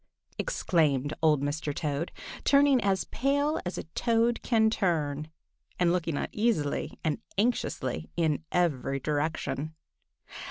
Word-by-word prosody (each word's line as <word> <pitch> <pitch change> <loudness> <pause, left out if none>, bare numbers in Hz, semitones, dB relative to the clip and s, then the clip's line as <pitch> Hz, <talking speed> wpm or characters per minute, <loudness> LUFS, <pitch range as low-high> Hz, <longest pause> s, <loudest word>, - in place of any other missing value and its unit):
exclaimed 150 - +1
old 150 -3 +4
Mr. 145 0 -2
Toad, 150 +1 -2 0.3
turning 280 -2 +5
as 195 -2 +2
pale 285 +3 0
as 180 - -4
a - - -3
Toad 230 0 +2
can 220 -2 +3
turn, 155 -7 0 0.5
and 175 -1 +3
looking 165 -4 -1
uneasily 210 -10 -1
and 155 -3 0 0.2
anxiously 130 - 0
in 160 -2 +1
every 140 -6 +1
direction. 155 +1 -2
165 Hz, 115 wpm, -29 LUFS, 145-220 Hz, 0.5 s, turning